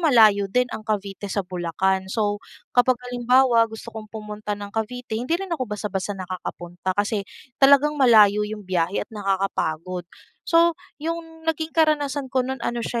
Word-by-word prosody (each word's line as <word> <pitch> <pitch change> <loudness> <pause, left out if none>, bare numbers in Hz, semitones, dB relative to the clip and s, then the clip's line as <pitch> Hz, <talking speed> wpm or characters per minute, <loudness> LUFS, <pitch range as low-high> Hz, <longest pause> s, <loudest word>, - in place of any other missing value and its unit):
malayo 220 - +5
din 250 +6 +2
ang - - -4
Cavite 200 -1 -3
sa 200 0 -1
Bulacan. 190 +2 -1
So, 205 0 -1 0.3
kapag 250 +1 +4
halimbawa 245 -1 +3
gusto 220 0 -9
kong 220 -1 -8
pumunta 210 -1 -5
ng 205 0 -8
Cavite, 225 +1 -3
hindi 260 +8 0
rin 385 0 -5
ako 255 -8 -2
basta-basta 205 -1 -3
nakakapunta, 185 0 -5
kasi 205 0 -1 0.3
talagang 280 +2 +6
malayo 210 -5 +6
'yong 210 0 -4
biyahe 180 0 0
at - - -48
nakakapagod. 185 -4 -2 0.4
So, 335 0 +5 0.2
'yong 325 +1 -6
naging 320 0 -2
karanasan 290 -4 +1
ko 260 - +3
no'n 265 +1 -3
ano 240 0 -1
siya, 235 0 -2
215 Hz, 155 wpm, -23 LUFS, 195-260 Hz, 0.4 s, talagang